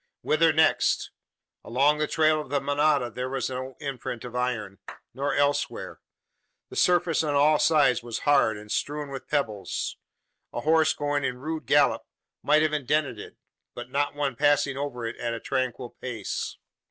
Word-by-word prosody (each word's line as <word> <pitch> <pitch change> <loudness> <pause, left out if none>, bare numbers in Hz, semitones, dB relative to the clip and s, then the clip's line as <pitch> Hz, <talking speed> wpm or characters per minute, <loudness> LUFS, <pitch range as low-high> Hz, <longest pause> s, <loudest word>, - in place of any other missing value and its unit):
Whither 160 +1 +3
next? 160 +1 +2 0.5
Along 140 +5 +2
the 155 - +1
trail 155 -1 +2
of 150 - -11
the 140 +1 +1
manada, 145 -2 +1
there 125 +2 -4
was 135 -1 -2
no 130 0 -5
imprint 125 -5 -5
of 125 0 -8
iron; 115 -6 -2 0.3
nor 140 +3 -1
elsewhere! 145 0 -1 0.7
The - - -10
surface 175 -3 +3
on 145 -2 -1
all 150 +1 +4
sides 145 -6 +4
was 115 -1 -5
hard, 140 -7 +4
and 105 0 -11
strewn 145 0 -2
with 135 -1 -7
pebbles. 110 -9 -2 0.6
A - - -3
horse 160 0 +3
going 145 -1 -1
in 125 -2 -2
rude 155 0 -5
gallop, - - +4 0.4
might 155 +1 +4
have 155 -1 +1
indented 145 -4 0
it; - - -10 0.4
but 120 +1 -8
not 145 +1 0
one 140 -3 -1
passing 145 +1 +2
over 135 -4 -4
it 115 - -5
at 115 -1 -2
a - - -5
tranquil 130 -2 -2
pace. 115 -6 -5
140 Hz, 165 wpm, -26 LUFS, 125-150 Hz, 0.7 s, all